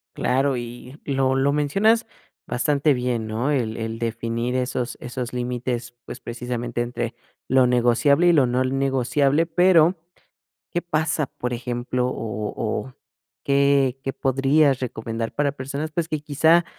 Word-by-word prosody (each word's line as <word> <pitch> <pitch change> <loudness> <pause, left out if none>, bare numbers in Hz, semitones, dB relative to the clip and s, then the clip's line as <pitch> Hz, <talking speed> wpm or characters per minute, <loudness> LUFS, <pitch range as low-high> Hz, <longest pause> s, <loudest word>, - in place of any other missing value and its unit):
Claro, 135 +1 +1
y 120 +4 -8
lo 135 -2 +1
lo 135 +1 +2
mencionas 195 +11 +2 0.4
bastante 145 +3 +1
bien, 125 -3 -1
¿no?, 110 +5 -2
el 120 -6 0
el 115 0 -4
definir 115 +1 -2
esos 125 -1 -2
esos 125 0 -5
límites, 120 -1 -3
pues, - - -8
precisamente, 120 0 -4
entre 120 -1 -3 0.3
lo 130 0 +4
negociable 125 +6 +3
y 175 - +6
lo 145 -5 +5
no 125 +1 +1
negociable, 135 +3 +1
pero, 175 0 +4 0.8
¿qué 175 - -1
pasa?, 155 -3 0
por 125 -1 -5
ejemplo, 125 +1 -2
o 105 -3 -4
o, 110 +3 -3 0.5
¿qué 140 -2 +3
qué 135 -1 -3
podrías 135 +1 +2
recomendar?, 115 -2 -4
para 145 -1 +1
personas, 140 +3 -5
pues, 165 0 -1
que 155 -2 -2
quizá, 160 +4 +3
130 Hz, 140 wpm, -23 LUFS, 120-145 Hz, 0.8 s, y